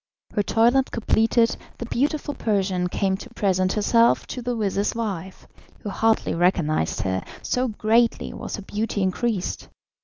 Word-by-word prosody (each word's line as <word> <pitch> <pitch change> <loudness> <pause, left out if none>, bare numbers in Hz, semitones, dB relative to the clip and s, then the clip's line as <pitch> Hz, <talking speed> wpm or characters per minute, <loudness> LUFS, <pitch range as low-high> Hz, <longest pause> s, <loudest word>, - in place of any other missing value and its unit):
Her 205 - +2
toilet 240 +6 +3
completed, 230 0 +2 0.2
the 235 - -5
beautiful 290 +5 -1
Persian 190 -6 0
came 190 +1 0
to 245 - -10
present 185 -2 +1
herself 230 +2 +3
to 250 - -5
the 245 0 -2
vizir's 205 -1 0
wife, 190 -5 -4 0.4
who 205 - -5
hardly 225 +2 +1
recognised 165 - +1
her, 95 -2 -1 0.2
so 255 +1 0
greatly 225 +1 +1
was - - -5
her 205 - -8
beauty 205 0 -2
increased. 190 +1 -1
210 Hz, 145 wpm, -24 LUFS, 190-235 Hz, 0.4 s, toilet